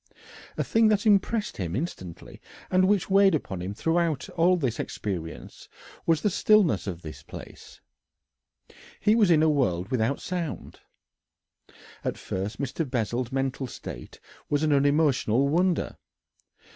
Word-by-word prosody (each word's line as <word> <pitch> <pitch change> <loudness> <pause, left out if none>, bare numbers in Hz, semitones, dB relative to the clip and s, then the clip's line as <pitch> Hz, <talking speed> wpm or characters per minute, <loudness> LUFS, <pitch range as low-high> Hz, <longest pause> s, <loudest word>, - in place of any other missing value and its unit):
A - - +1
thing 225 0 +3
that 210 -1 +2
impressed 210 +1 +2
him 90 -2 -3
instantly, 95 - -6 0.3
and 185 0 +4
which 205 -1 +2
weighed 195 -2 +5
upon 95 - -4
him 95 +3 -5
throughout 165 0 0
all 180 +2 +3
this 130 -8 -2
experience, 85 -6 -6 0.4
was 165 -2 +2
the 210 - +3
stillness 185 - +3
of 90 -3 -5
this 75 -1 -8
place - - -12 1.2
he 210 - +3
was 220 -4 +4
in 160 -2 +5
a - - +4
world 95 - 0
without 125 +2 0
sound. 175 -4 -5 1.2
At - - -2
first 95 +3 -4
Mr. 140 +4 -2
Bessel's 120 +1 -2
mental 135 0 -2
state - - -9 0.3
was 145 +1 +1
an 155 -1 +3
unemotional 140 -3 +3
wonder. 175 +4 +1
145 Hz, 135 wpm, -26 LUFS, 110-180 Hz, 1.2 s, weighed